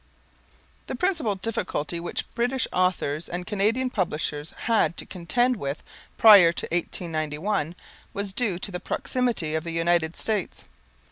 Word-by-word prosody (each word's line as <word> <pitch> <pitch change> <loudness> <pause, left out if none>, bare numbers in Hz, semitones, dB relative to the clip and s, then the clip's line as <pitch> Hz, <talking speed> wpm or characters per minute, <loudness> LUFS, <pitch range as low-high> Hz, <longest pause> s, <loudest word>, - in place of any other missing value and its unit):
The - - -3
principal 325 - 0
difficulty 190 -6 -3
which 170 0 -3
British 250 +2 0
authors 175 -4 0
and 180 +1 -4
Canadian 220 +6 +1
publishers 155 -6 -2
had 225 -7 +2
to - - -6
contend 240 +8 0
with 140 -3 -4 0.3
prior 200 -6 +9
to 170 - -4
1891, 165 0 -2 0.4
was 200 -1 -3
due 205 -6 0
to 195 +2 -6
the 180 - -4
proximity 240 -13 -1
of 160 0 -1
the 170 - -5
United 165 0 +1
States. 210 -5 -1
180 Hz, 135 wpm, -25 LUFS, 165-225 Hz, 0.4 s, prior